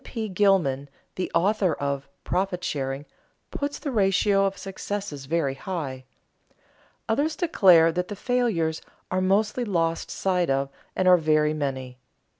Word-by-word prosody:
P. 220 Hz, -2 st, -5 dB
Gilman, 180 Hz, -9 st, +2 dB, 0.2 s
the 185 Hz, -, -4 dB
author 195 Hz, -2 st, +2 dB
of 140 Hz, -1 st, -3 dB
"Profit 180 Hz, 0 st, -1 dB
Sharing," 135 Hz, 0 st, -3 dB, 0.5 s
puts 285 Hz, 0 st, -3 dB
the 285 Hz, -, -4 dB
ratio 195 Hz, -2 st, +3 dB
of 195 Hz, 0 st, -2 dB
successes 195 Hz, -7 st, -5 dB
very 155 Hz, -3 st, 0 dB
high. 135 Hz, -5 st, -5 dB, 1.0 s
Others 290 Hz, +8 st, +1 dB
declare 185 Hz, -, +5 dB
that 180 Hz, +2 st, -2 dB
the 205 Hz, -, -6 dB
failures 200 Hz, -10 st, 0 dB, 0.3 s
are 185 Hz, 0 st, +1 dB
mostly 210 Hz, +6 st, +1 dB
lost 165 Hz, -6 st, -1 dB
sight 180 Hz, -3 st, 0 dB
of 135 Hz, 0 st, +1 dB, 0.3 s
and 185 Hz, -, +1 dB
are 180 Hz, 0 st, +8 dB
very 155 Hz, -1 st, +2 dB
many. 130 Hz, -4 st, -4 dB
180 Hz, 135 wpm, -25 LUFS, 145-200 Hz, 1.0 s, are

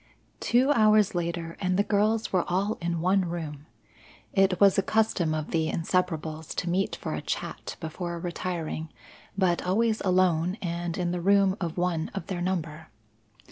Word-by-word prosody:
Two 255 Hz, +4 st, +3 dB
hours 215 Hz, -4 st, +4 dB
later 170 Hz, -1 st, -3 dB
and 185 Hz, -1 st, +1 dB
the 200 Hz, -, +4 dB
girls 215 Hz, +2 st, +1 dB
were 180 Hz, -2 st, +3 dB
all 195 Hz, +5 st, 0 dB
in 170 Hz, -1 st, -1 dB
one 190 Hz, +2 st, +3 dB
room. 155 Hz, -4 st, -6 dB, 0.7 s
It 195 Hz, -2 st, +3 dB
was 200 Hz, -1 st, +6 dB
a -, -, +4 dB
custom 190 Hz, -6 st, +1 dB
of 155 Hz, -1 st, -4 dB
the 160 Hz, -1 st, +1 dB
Inseparables 160 Hz, -2 st, -2 dB
to 180 Hz, -, -2 dB
meet 190 Hz, +2 st, 0 dB
for -, -, -5 dB
a -, -, -3 dB
chat -, -, -4 dB
before 170 Hz, +1 st, -4 dB
retiring, 170 Hz, -2 st, -4 dB, 0.5 s
but 180 Hz, -3 st, +2 dB
always 220 Hz, +4 st, +1 dB
alone 180 Hz, -1 st, +2 dB
and 170 Hz, -1 st, -3 dB
in 175 Hz, -2 st, -1 dB
the 175 Hz, -1 st, -2 dB
room 195 Hz, +1 st, +4 dB
of 170 Hz, -1 st, -3 dB
one 175 Hz, -2 st, 0 dB
of -, -, -4 dB
their 185 Hz, -3 st, -4 dB
number. 165 Hz, -4 st, -3 dB
180 Hz, 165 wpm, -27 LUFS, 165-195 Hz, 0.7 s, was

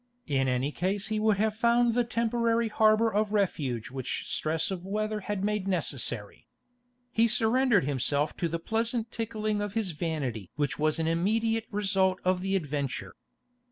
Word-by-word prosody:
In 135 Hz, -3 st, +1 dB
any 130 Hz, +3 st, 0 dB
case 190 Hz, +5 st, -2 dB
he 215 Hz, -1 st, 0 dB
would 215 Hz, -2 st, +3 dB
have 215 Hz, +1 st, +1 dB
found 235 Hz, +1 st, +3 dB
the 245 Hz, +1 st, +2 dB
temporary 235 Hz, 0 st, +1 dB
harbour 215 Hz, +1 st, +3 dB
of 210 Hz, 0 st, +1 dB
refuge 140 Hz, -, -1 dB
which 130 Hz, -1 st, -3 dB
stress 160 Hz, +3 st, 0 dB
of 180 Hz, -2 st, -4 dB
weather 215 Hz, +2 st, -2 dB
had 205 Hz, -1 st, -3 dB
made 210 Hz, -2 st, -1 dB
necessary. 140 Hz, -, -3 dB, 0.6 s
He 230 Hz, 0 st, +3 dB
surrendered 230 Hz, -, +3 dB
himself 145 Hz, +2 st, 0 dB
to 170 Hz, -, 0 dB
the 165 Hz, +1 st, -2 dB
pleasant 225 Hz, +5 st, -1 dB
tickling 215 Hz, -2 st, -2 dB
of 205 Hz, 0 st, -4 dB
his 215 Hz, -5 st, 0 dB
vanity 145 Hz, -, -3 dB
which 145 Hz, -1 st, -1 dB
was 155 Hz, +1 st, +2 dB
an 165 Hz, -, -1 dB
immediate 220 Hz, +7 st, +1 dB
result 195 Hz, -3 st, +1 dB
of 185 Hz, 0 st, +2 dB
the 195 Hz, +1 st, 0 dB
adventure. 145 Hz, -6 st, -3 dB
200 Hz, 160 wpm, -28 LUFS, 155-220 Hz, 0.6 s, would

